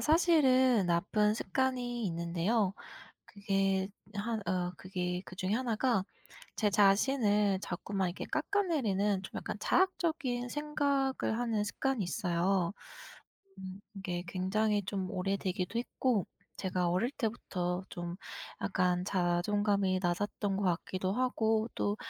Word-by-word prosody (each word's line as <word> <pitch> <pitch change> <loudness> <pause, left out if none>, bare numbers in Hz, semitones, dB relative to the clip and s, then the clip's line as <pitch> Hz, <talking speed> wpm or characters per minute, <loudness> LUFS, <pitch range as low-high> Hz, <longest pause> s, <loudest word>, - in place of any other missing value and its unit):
사실은 260 - +4
나쁜 205 +5 +2
습관이 245 +1 -1
있는데요 175 +4 0 0.5
그게 195 -1 0 0.3
한 220 +2 -2
어 180 -1 0
그게 180 -1 -3
그중에 185 +1 -3
1 235 -2 0
가 230 -5 +2 0.5
제 210 -2 +2
자신을 205 0 +4
자꾸만 190 +1 -2
이렇게 175 - -6
깎아내리는 270 - +1
좀 190 - -8
약간 - - -4
자학적인 315 -10 +1
생각을 280 -5 0
하는 225 -4 0
습관이 265 +3 -1
있어요. 180 +1 0 0.8
음 190 +1 -8
이게 180 -3 -4
굉장히 205 +4 +1
좀 190 -1 -3
오래되기도 195 +1 -1
했고 240 -4 0 0.3
제가 180 -2 0
어릴 185 +8 +1
때부터 185 -8 -2
좀 175 0 -5 0.4
약간 180 -2 +1
자존감이 190 +1 +1
낮았던 195 +2 -1
것 200 - -1
같기도 185 +1 0
하고 225 -2 +1
또 205 +1 0
200 Hz, 255 characters per minute, -32 LUFS, 185-240 Hz, 0.8 s, 사실은